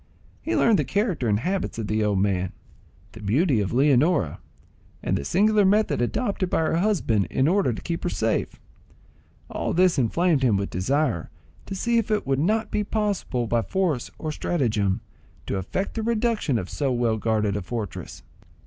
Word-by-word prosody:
He 330 - -2
learned 225 -4 +4
the - - +2
character 200 - -1
and 105 0 +1
habits 190 -1 -2
of 115 - -3
the 110 +1 0
old 105 -2 +1
man, 95 -2 0 0.6
the 110 - -12
beauty 125 - +2
of 95 - -2
Leonora, 140 - +2 0.6
and - - 0
the - - -2
singular 210 - +3
method 205 - +2
adopted 195 - -1
by - - +1
her 160 0 +1
husband 170 - +1
in 135 - +1
order 185 -5 +2
to 110 - -5
keep 170 -1 -3
her 175 - -1
safe. 110 -7 -1 0.9
All - - -3
this 180 -3 +4
inflamed 155 +5 +2
him 120 -6 +3
with 100 0 -3
desire 120 - 0 0.4
to 195 - -4
see 235 +4 +1
if 225 - -3
it 215 -1 0
would 135 0 0
not 215 +8 +1
be 210 - 0
possible, 205 - -1
by 115 +1 +1
force 170 - -1
or 155 - -4
stratagem, 110 - 0 0.4
to - - -2
effect 140 - -3
the 225 - -3
reduction 225 - 0
of 90 - -3
so 140 +4 -1
well 120 -2 +1
guarded 110 -2 0
a 100 - -2
fortress. 110 +2 -6
140 Hz, 180 wpm, -24 LUFS, -, 0.9 s, learned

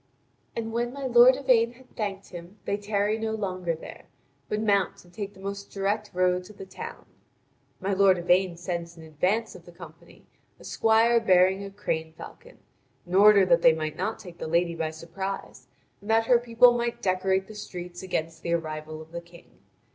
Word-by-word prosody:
And 225 -1 -4
when 240 +1 -1
my 280 -1 -6
lord 245 +1 +7
Yvain 245 -3 +2
had 255 +1 -21
thanked 200 -3 -4
him, 175 +3 -10
they 200 - 0
tarry 205 +1 -1
no 220 0 -2
longer 185 -5 -2
there, 160 - -11 0.4
but 210 - -1
mount 200 -3 0
and 175 - -21
take 205 -1 -6
the - - -16
most 200 +1 -6
direct 200 +2 -2
road 180 0 +1
to 215 - -13
the 195 - -10
town. 190 - -9 0.7
My 195 +1 -1
lord 190 -1 +4
Yvain 180 0 +2
sends 170 -1 -5
in 165 - -11
advance 180 +9 -1
of - - -14
the - - -13
company - - -15 0.3
a - - -15
squire 225 +1 +3
beating 190 -2 +3
a 200 - -6
crane 160 -5 -4
falcon, - - -12 0.5
in 175 - -9
order 200 0 +7
that 170 -2 +4
they 165 - +6
might 155 -1 -4
not 220 +6 -2
take 175 -3 -12
the - - -4
lady 170 +1 +1
by 165 -1 -2
surprise, 170 +5 -7 0.3
and 205 - -11
that 225 0 +3
her 240 0 +5
people 240 +1 +5
might 235 0 -2
decorate 190 0 +1
the 215 - -12
streets 180 -4 -8
against 165 -3 -3
the 170 - -2
arrival 155 -1 -4
of 160 - -21
the 170 0 -6
King. 170 0 -19
195 Hz, 195 wpm, -26 LUFS, 170-220 Hz, 0.7 s, lord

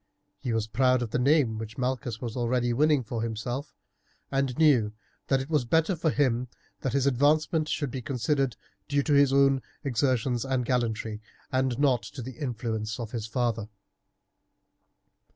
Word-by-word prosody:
He 125 - -3
was 115 -1 0
proud 125 +2 +2
of 115 - -5
the 125 - 0
name 130 -5 +3
which 110 0 -7
Malchus 125 -3 -2
was 120 -4 -5
already 120 0 +1
winning 150 +1 +3
for 115 0 -4
himself, 115 +5 -4 0.6
and 135 -2 0
knew 125 -10 +4 0.3
that 135 - +3
it 135 - -6
was 150 -4 +1
better 160 +8 +2
for 165 0 0
him 125 -4 +1 0.3
that 130 - -2
his 140 -1 +2
advancement 150 +4 +2
should 145 -4 -1
be 130 - -4
considered 135 0 0 0.3
due 140 0 +1
to 150 - +1
his 140 -1 +5
own 135 -1 +4 0.2
exertions 125 -2 +1
and 130 -2 -1
gallantry 115 -3 -1 0.3
and 130 -2 +1
not 135 -4 +3
to 130 - -8
the 125 0 -9
influence 115 -4 -3
of 115 -2 -5
his 115 -3 -4
father. 115 -2 -1
125 Hz, 165 wpm, -28 LUFS, 115-140 Hz, 0.6 s, his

